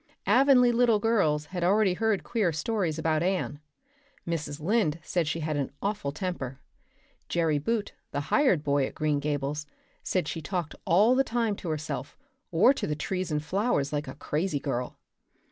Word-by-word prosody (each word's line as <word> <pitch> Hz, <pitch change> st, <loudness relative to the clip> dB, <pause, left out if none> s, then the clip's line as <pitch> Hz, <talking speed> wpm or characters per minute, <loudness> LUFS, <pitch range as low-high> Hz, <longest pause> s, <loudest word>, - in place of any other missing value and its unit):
Avonlea 255 Hz, -2 st, +5 dB
little 235 Hz, -2 st, +4 dB
girls 195 Hz, -9 st, +1 dB
had 175 Hz, +2 st, -4 dB
already 195 Hz, +1 st, +3 dB
heard 220 Hz, +1 st, 0 dB
queer 215 Hz, -7 st, 0 dB
stories 165 Hz, 0 st, -1 dB
about 160 Hz, -1 st, +1 dB
Anne. 180 Hz, -5 st, -1 dB, 0.7 s
Mrs. 150 Hz, -3 st, -3 dB
Lynde 175 Hz, -2 st, +1 dB
said 170 Hz, -2 st, 0 dB
she 165 Hz, +2 st, -2 dB
had 155 Hz, 0 st, -1 dB
an 140 Hz, -, -2 dB
awful 200 Hz, -8 st, -2 dB
temper; 140 Hz, -5 st, -4 dB, 0.7 s
Jerry 160 Hz, -3 st, +1 dB
Buote, 215 Hz, +6 st, -1 dB, 0.2 s
the 145 Hz, -, -2 dB
hired 260 Hz, -, +4 dB
boy 140 Hz, -2 st, +2 dB
at -, -, -11 dB
Green 150 Hz, -2 st, +1 dB
Gables, 145 Hz, +1 st, -2 dB, 0.3 s
said 180 Hz, -5 st, -1 dB
she 165 Hz, -, -4 dB
talked 170 Hz, -1 st, -3 dB
all 205 Hz, +8 st, +5 dB
the 265 Hz, +1 st, +4 dB
time 230 Hz, -4 st, 0 dB
to 175 Hz, -, -6 dB
herself 155 Hz, 0 st, -4 dB, 0.3 s
or 185 Hz, +11 st, +5 dB
to -, -, -3 dB
the 150 Hz, -, -1 dB
trees 185 Hz, +4 st, -3 dB
and 150 Hz, 0 st, -1 dB
flowers 185 Hz, -, 0 dB
like 150 Hz, 0 st, -2 dB
a 130 Hz, -, -7 dB
crazy 150 Hz, +2 st, -1 dB
girl. 125 Hz, -3 st, -3 dB
165 Hz, 170 wpm, -28 LUFS, 150-210 Hz, 0.7 s, Avonlea